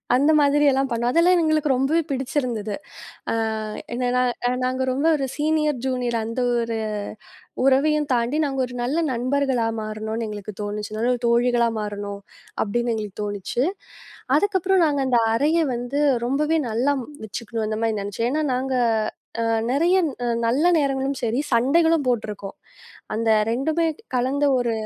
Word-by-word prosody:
அந்த 285 +5 +4
மாதிரி 290 0 +3
எல்லாம் 270 0 +1
பண்ணோம். 235 +1 0
அதெல்லாம் 350 +4 +4
எங்களுக்கு 310 -2 +1
ரொம்பவே 270 +6 +2
பிடிச்சிருந்தது. 255 -6 -2 0.6
அ - - 0 0.6
என்ன 245 0 -1
நான் 250 0 0
நாங்க 255 +1 -1
ரொம்ப 275 +5 -1
ஒரு 275 -2 -1
ஜீனியர், 305 -2 +1
ஜுனியர் 250 -3 -1
அந்த 230 +3 -4 0.2
ஒரு 230 -1 -2 0.9
உறவையும் 295 +3 +3
தாண்டி 240 +5 0
நாங்க 270 -2 -2
ஒரு 250 - -10
நல்ல 270 +7 0
நண்பர்களா 255 0 0
மாறணோன்னு 220 +1 -4
எங்களுக்குத் 210 -1 -7
தோணுச்சு. 210 +1 -4
நல்ல 245 +2 +2
தோழிகளா 235 0 +3
மாறணும் 205 -1 -5 0.4
அப்பிடின்னு 235 +3 0
எங்களுக்குத் 210 -2 -5
தோணுச்சு. 205 +4 -2 0.7
அதுக்கப்புறம் 380 0 +2
நாங்க 285 -2 0
அந்த 245 -2 +4
அறைய 300 +8 +2 0.2
வந்து 245 +4 -2 0.3
ரொம்பவே 300 +5 +1
நல்லா 250 +6 +1 0.3
வச்சுக்கிணோம் 225 +1 -4
அந்தமாரி 220 0 -1
நினைச்சுன். 205 +4 -2
ஏன்னா 310 +2 0
நாங்க 260 +1 -1 0.7
அ - - +1 0.3
நிறைய 345 +7 +3 0.5
நல்ல 260 +7 +2
நேரங்களும் 270 -1 -1
சரி 230 +2 0
சண்டைகளும் 320 +7 +3
போட்டுருக்கோம். 210 -4 -3 0.6
அந்த 225 +1 0 0.2
2 310 +8 0 0.3
கலந்த 260 +3 +1
ஒரு 240 -2 0
250 Hz, 135 wpm, -23 LUFS, 230-285 Hz, 0.9 s, அந்த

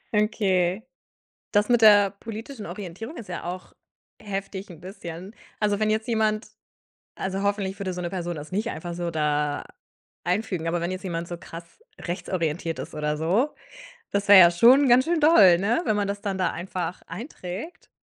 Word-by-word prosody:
Okay. 195 -2 +1 0.7
Das 205 0 +2
mit 240 -2 +3
der 205 -2 +7
politischen 220 +3 -8
Orientierung 195 - -7
ist 210 - -9
ja 175 - -5
auch 180 +1 -7 0.5
heftig 195 -1 -5
'n 165 - -12
bisschen. 180 +1 -9 0.2
Also 205 -1 0
wenn 215 0 +2
jetzt 220 +2 0
jemand 220 -2 0 0.7
also 190 +1 -3
hoffentlich 200 -1 -1
würde 190 -2 -3
so 180 - -5
'ne 175 -1 -3
Person 175 -2 -3
das 150 0 -8
nicht 215 +5 -1
einfach 170 +2 -6
so 175 0 -3
da 150 -2 0 0.6
einfügen, 180 -2 -1
aber 170 +1 0
wenn 170 +1 -2
jetzt 185 +1 -6
jemand 170 -2 -3
so 175 - -5
krass 165 0 -9 0.4
rechtsorientiert 170 -2 -3
ist - - -8
oder 150 0 -1
so, 195 - +1 0.6
das 200 0 -1
wäre 200 -1 +11
ja 170 -2 +9
schon 250 +10 +6
ganz 250 +1 +6
schön 340 0 +1
doll, 215 - +7
ne, 215 - +1
wenn 215 - +1
man 205 -1 0
das 200 0 -4
dann 200 -2 -2
da 185 -2 +1
einfach 175 0 -5
einträgt, 230 - -8
190 Hz, 175 wpm, -25 LUFS, 175-215 Hz, 0.7 s, wäre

